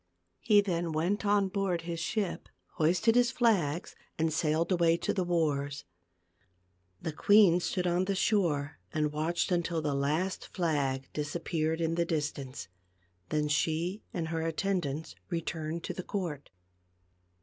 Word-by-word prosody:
He 210 -2 +5
then 170 -4 -1
went 185 +7 0
on 200 -1 +3
board 190 -3 -1
his 170 0 -4
ship, 195 +2 -2 0.3
hoisted 175 +8 +3
his 245 0 +4
flags 195 - +1 0.2
and 160 -1 +1
sailed 160 +3 +1
away 170 -2 +4
to - - -1
the 190 - 0
wars. 145 - 0 1.1
The 160 - -3
queen 200 0 +6
stood 180 +1 -1
on 175 +1 +2
the 195 0 0
shore 160 -8 +1
and 150 -1 0
watched 160 +5 -1
until 170 -1 +1
the 150 -2 -1
last 150 +7 -1
flag 140 -7 -1
disappeared 160 +1 -1
in 165 0 0
the 170 0 +1
distance, 145 - -3 0.6
then 150 -1 +1
she 165 +6 0
and 165 -2 -3
her 165 0 -1
attendants 165 -2 -2 0.2
returned 165 -1 -3
to - - -3
the - - -5
court. 175 -7 -4
165 Hz, 140 wpm, -30 LUFS, 155-185 Hz, 1.1 s, queen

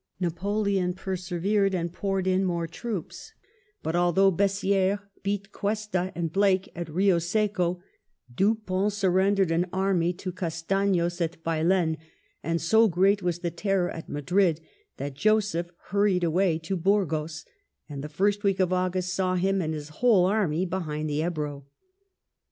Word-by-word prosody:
Napoleon 190 +1 0
persevered, 190 +2 0
and 170 -1 -2
poured 195 0 -1
in 185 +1 +2
more 170 -2 -1
troops; 195 +3 -6 0.5
but 160 - -1
although 175 +3 +4
B^ssi^res 195 +1 +1 0.2
beat 200 0 -3
Cuesta 205 -3 -2
and 165 -2 -2
Blake 195 -1 +2
at 170 -1 -4
Eio 180 +2 +2
Seco, 180 -1 0 0.5
Dupont 200 - +1
surrendered 195 -1 +2
an 170 +2 +1
army 190 -3 +1
to 185 +1 -6
Castan5s 175 0 -1
at 165 0 -3
Baylen, 165 0 +1 0.4
and 165 +1 -1
so 220 +7 +4
great 195 +2 +3
was 175 -1 -2
the 170 -2 -2
terror 190 +1 0
at 165 - -8
Madrid 165 +3 +1 0.4
that 140 0 -4
Joseph 200 0 +1 0.2
hurried 200 -2 +2
away 170 0 +2
to 165 +4 -4
Burgos, 160 -4 0 0.4
and 140 -2 -6
the 150 - -5
first 200 +6 0
week 195 -2 +1
of 185 -1 +2
August 185 0 0
saw 185 0 0
him 190 +2 +1
and 160 -2 -2
his 150 0 -7
whole 195 +2 +3
army 185 -4 +1
behind 155 -4 -3
the 145 +1 0
Ebro. 150 -4 -3
185 Hz, 145 wpm, -26 LUFS, 165-195 Hz, 0.5 s, although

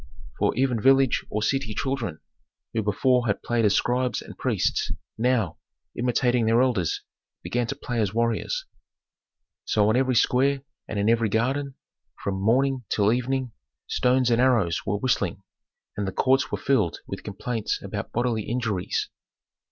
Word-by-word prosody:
For - - +2
even 125 -2 +1
village 135 0 +4
or 105 0 -2
city 130 -3 0
children, 120 - -2 0.5
who 115 - +1
before 120 +4 +2
had 100 - -1
played 120 -2 +1
as 105 - +4
scribes 125 +1 +1
and - - -10
priests, - - 0 0.2
now, 115 -7 0 0.4
imitating 120 -1 +1
their 115 +1 +4
elders, 105 -11 0 0.4
began 120 -1 -1
to 140 - -3
play 120 -4 -2
as 100 -4 0
warriors. 115 - -1 1.0
So 105 -1 +2
on 110 - +3
every 130 0 +2
square 135 +3 +2 0.2
and 110 - -4
in 100 +1 +1
every 115 -1 +3
garden, 130 +6 0 0.5
from 95 -1 -2
morning 130 +4 +2
till 105 +1 +3
evening, 125 0 -1 0.3
stones 125 0 +2
and 115 +1 +3
arrows 110 -10 +2
were 100 +1 +1
whistling, 100 -6 -1 0.5
and 100 -1 -2
the - - -2
courts 130 +6 +2
were - - -1
filled 110 -11 +1
with - - -6
complaints 110 +2 -3
about - - -5
bodily 120 -3 0
injuries. 115 -6 -1
120 Hz, 150 wpm, -25 LUFS, 105-130 Hz, 1.0 s, village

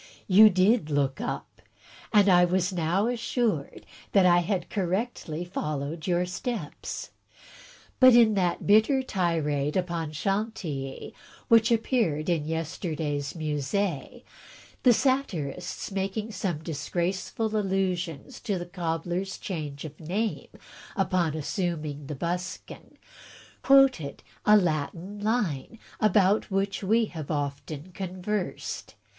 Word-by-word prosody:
You 210 +3 +8
did 185 -2 +3
look 140 +3 0
up; 240 - -5 0.5
and 205 -2 +5
I 180 -2 +6
was 180 +1 +1
now 175 +4 +1
assured 235 - -1 0.3
that 195 -2 +6
I 175 -1 +6
had 180 0 -1
correctly 185 -3 -2
followed 155 -2 -4
your 175 0 +2
steps. 185 - -5 0.9
But 255 -2 +8
in 230 -2 +6
that 180 -3 0
bitter 220 +6 +4
tirade 160 - 0
upon 170 -4 -2
Chantilly, 165 -6 -3 0.4
which 230 0 +5
appeared 220 - +1
in 160 -3 0
yester 160 +1 -3
day's 145 -2 -2
Mus^e, 155 +1 -2 0.6
the 250 - +6
satirists, 205 - -1
making 200 +3 -2
some 180 -6 -3
disgraceful 180 +8 -2
allusions 190 -6 -1
to 200 -3 -2
the 175 - -5
cobbler's 175 +2 -3
change 150 -6 -5
of 150 -1 -9
name 200 +8 -2 0.5
upon 180 -6 +1
assuming 155 -3 -3
the 150 - -4
buskin, 175 +5 -5 0.6
quoted 270 - +4 0.2
a 210 0 +8
Latin 175 +3 -2
line 210 - -1 0.2
about 205 -1 +3
which 195 0 -1
we 225 +4 +3
have 160 -8 -8
often 145 +2 -4
conversed. 185 +2 -4
180 Hz, 115 wpm, -27 LUFS, 155-210 Hz, 0.9 s, You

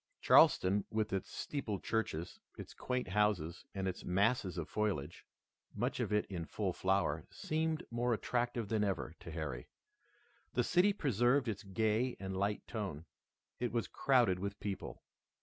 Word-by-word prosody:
Charleston, 95 +2 +6
with 110 -2 -1
its 95 - -2
steepled 110 -9 -4
churches, 90 -7 -2 0.2
its - - -8
quaint 125 -5 -2
houses, 95 -5 +1
and 95 -1 -1
its 95 - -4
masses 100 0 +1
of 85 - -3
foliage, 100 -10 -2 0.5
much - - -1
of - - -1
it 105 0 +2
in 90 -4 -4
full 95 +1 -2
flower, 95 +1 0
seemed 160 0 -1
more 120 +1 0
attractive 120 0 0
than 110 0 +1
ever 95 -5 -1
to - - -9
Harry. 75 -7 -4 0.9
The 125 - +2
city 180 - +4
preserved 130 - +2
its 110 0 -2
gay 110 +4 0
and 95 -1 -4
light 100 +2 -1
tone. 95 -8 -4 0.5
It 120 -1 -1
was 115 -1 -1
crowded 120 -9 +3
with 100 +1 -4
people. 100 -2 -5
105 Hz, 150 wpm, -35 LUFS, 95-120 Hz, 0.9 s, Charleston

